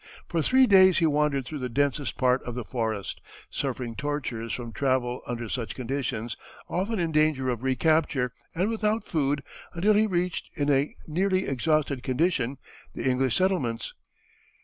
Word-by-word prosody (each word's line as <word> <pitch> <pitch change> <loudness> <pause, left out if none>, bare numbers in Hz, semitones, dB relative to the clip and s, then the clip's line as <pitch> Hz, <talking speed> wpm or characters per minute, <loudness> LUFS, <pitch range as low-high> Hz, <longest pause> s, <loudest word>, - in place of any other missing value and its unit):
For 170 -2 0
three 260 - +5
days 190 -4 +6
he 165 - +3
wandered 150 -3 +1
through 150 +3 -6
the 125 -1 -3
densest 145 +2 0
part 130 0 +3
of 120 - -6
the 125 - -3
forest, 110 -5 -3 0.3
suffering 125 -3 -3
tortures 125 -4 -3
from 120 -2 -4
travel 130 -2 0
under 120 -1 -3
such 115 +1 -3
conditions, 125 -3 -3 0.3
often 200 +5 -1
in 170 -3 0
danger 155 -4 +2
of 120 -2 -2
recapture, 135 -1 +1 0.2
and 190 +6 +1
without 220 0 0
food 145 -3 0 0.3
until 200 +6 +3
he 215 +1 +4
reached, 180 -2 -1
in 145 -2 +1
a 140 +1 +1
nearly 185 +4 +1
exhausted 140 0 0
condition, 130 -1 0 0.4
the - - -2
English 130 -2 +2
settlements. 150 -12 0
140 Hz, 155 wpm, -27 LUFS, 125-170 Hz, 0.4 s, days